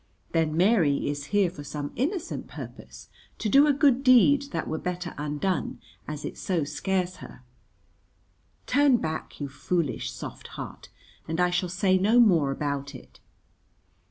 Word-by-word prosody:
Then 160 -1 +1
Mary 175 -7 +3
is 145 0 -3
here 195 +2 +2
for 145 -5 -9
some 145 0 -5
innocent 335 - -2
purpose, - - -10 0.3
to 220 - -2
do 275 +7 +6
a - - +5
good 275 -2 +3
deed 275 +2 +6
that - - -3
were 160 - -3
better 180 -1 -4
undone, 150 +6 -2 0.3
as 150 -1 -5
it - - -6
so 175 -5 0
scares 185 +4 -2
her. 125 - -12 1.2
Turn 285 -3 +4
back, 160 -7 -5
you 145 - -3
foolish, 150 +1 -2
soft - - -8
heart, - - -8 0.4
and 165 +2 -3
I 180 0 +3
shall 180 0 0
say 185 +1 +2
no 215 +6 +4
more 175 -12 +5
about 140 0 -3
it. 125 - -14
180 Hz, 155 wpm, -26 LUFS, 150-225 Hz, 1.2 s, do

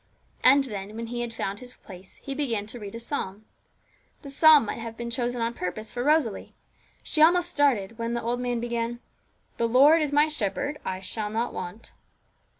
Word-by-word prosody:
And 275 +2 +7
then, 210 -4 -6
when 230 +1 -5
he 240 +1 -4
had 240 -1 -4
found 200 -3 -4
his 250 0 -11
place, 185 -1 -13
he 275 - -7
began 240 -8 -2
to 230 +3 -8
read 205 0 -8
a - - -5
psalm. 220 -5 -5 0.8
The 280 - -7
psalm 305 -2 +7
might 210 - -4
have 230 0 -7
been 235 0 -5
chosen 245 0 -2
on 230 +1 -1
purpose 215 +2 -4
for 245 - -3
Rosalie; 290 -7 +1 0.5
she 310 - 0
almost 350 +2 +5
started 235 - +1
when 230 +1 -2
the 235 - -3
old 240 +1 -1
man 245 -1 -1
began 235 0 -3 0.6
'The 230 - +1
Lord 285 +7 +6
is 300 -2 0
my 295 +1 +4
shepherd: 290 +1 -2
I 185 0 -4
shall 210 +2 -3
not 230 +3 -2
want.' 180 +6 -7
235 Hz, 195 wpm, -26 LUFS, 220-275 Hz, 0.8 s, And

